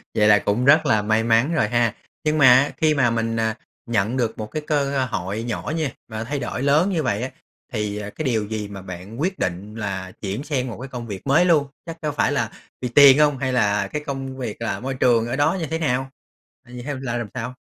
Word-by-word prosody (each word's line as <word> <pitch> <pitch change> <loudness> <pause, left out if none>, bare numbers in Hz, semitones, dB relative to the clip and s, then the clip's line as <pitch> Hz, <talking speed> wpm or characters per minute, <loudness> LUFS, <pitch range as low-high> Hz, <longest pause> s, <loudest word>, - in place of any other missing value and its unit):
Vậy 105 0 +4
là 105 -1 +6
cũng 110 +7 0
rất 155 +3 +6
là 110 -1 +3
may 110 +1 +1
mắn 115 +8 +3
rồi 155 - +2
ha. 120 -2 +1 0.3
Nhưng 155 0 +1
mà 145 - +6
á 135 +3 +4
khi 155 -1 +3
mà 130 -5 +3
mình, 115 0 -1
à, 110 0 0 0.3
nhận 115 +3 +1
được 115 -3 -1
một 110 - -4
cái 155 - -4
cơ 140 -3 +1
hội 95 +4 -3
nhỏ 120 +5 -3
nha, 155 -6 -1 0.2
mà 110 0 -4
thay 140 +4 -3
đổi 120 0 -4
lớn 150 +7 +3
như 165 -6 0
vậy 110 -1 -1
á, 130 - -3 0.4
thì, 105 -1 -2
à, 105 0 -5
cái 155 - -6
điều 110 -5 +1
gì 105 -1 -4
mà 100 -1 -8
bạn 95 +7 -8
quyết 185 +2 -1
định 95 +4 -3
là 95 -4 -4
chuyển 100 +7 -3
sang 135 -4 -2
một 115 - -6
cái 135 - -6
công 120 -2 -7
việc 100 +5 -7
mới 160 +6 +4
luôn? 150 -5 +3 0.2
Chắc 165 -1 -7
có 150 -1 -1
phải 145 - +1
là - - 0 0.3
vì 125 - -2
tiền 140 +2 +8
hông, 145 -2 +4
hay 130 -1 -2
là 105 -4 +2
cái 150 +7 -5
công 135 -1 -5
việc 115 -3 -5
là 115 - -2
môi 130 +2 -3
trường 120 -3 +2
ở 120 - -2
đó 145 +6 +2
như 160 - -2
thế 160 +2 -2
nào? 135 -3 0 0.6
Vậy 125 0 -9
theo 145 -1 -3
là 120 -2 -2
làm 120 -3 -3
sao? 125 0 -4
125 Hz, 250 wpm, -22 LUFS, 110-140 Hz, 0.6 s, tiền